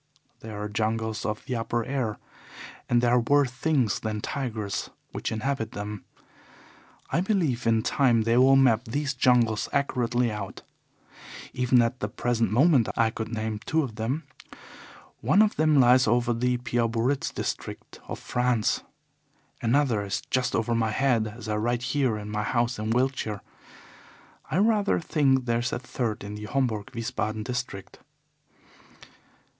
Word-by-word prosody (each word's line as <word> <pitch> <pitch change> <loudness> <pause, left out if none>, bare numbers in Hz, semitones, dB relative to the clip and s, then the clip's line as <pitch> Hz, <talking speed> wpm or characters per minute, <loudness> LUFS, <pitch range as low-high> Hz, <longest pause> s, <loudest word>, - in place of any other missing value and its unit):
There 110 -2 -8
are 105 - -3
jungles 110 +1 -2
of 105 0 -4
the 130 - -3
upper 115 0 -1
air, 130 -6 -2 0.7
and 120 0 +3
there 120 - +3
are 125 - +5
worse 140 +2 +3
things 130 -4 +1
than 110 -1 -3
tigers 110 -5 -3 0.2
which - - -4
inhabit 115 +1 -2
them. 105 0 -6 1.1
I 170 - +2
believe 165 - 0
in 115 -1 +3
time 120 -5 +3
they 115 +1 +2
will 130 +2 +6
map 125 -3 +4
these 140 +5 -2
jungles 120 -4 +2
accurately 125 -3 0
out. 105 -2 -6 0.9
Even 125 -1 +3
at 115 +2 -2
the 105 - -2
present 115 0 -1
moment 135 0 +4
I 115 -1 +3
could 110 0 -5
name 110 -1 -3
two 160 0 +1
of 125 -5 -5
them. 120 +9 -2 1.0
One 145 - +3
of 215 - 0
them 155 -2 +3
lies 125 0 +5
over 120 +1 +2
the 125 +1 0
Pau 120 -1 0
Biarritz 120 +5 0
district - - -5
of - - -5
France. 125 -3 0 0.8
Another 120 -3 +2
is 100 -2 -2
just 130 -1 +1
over 115 +1 0
my 115 -1 +1
head 115 -1 +1
as 110 +1 -9
I 105 -1 -1
write 120 +3 -1
here 130 -7 +1
in 105 -1 -7
my 105 0 -2
house 120 +1 0
in 110 +1 -3
Wiltshire. 120 -4 0 1.1
I - - 0
rather 210 0 +3
think 135 -6 +2
there 115 -1 +1
is 120 - -2
a - - -1
third 120 -4 -3
in 100 +1 -6
the 105 0 -7
Homburg 110 -4 -1
Wiesbaden 110 -2 -3
district. 125 -5 -5
120 Hz, 155 wpm, -26 LUFS, 110-130 Hz, 1.1 s, will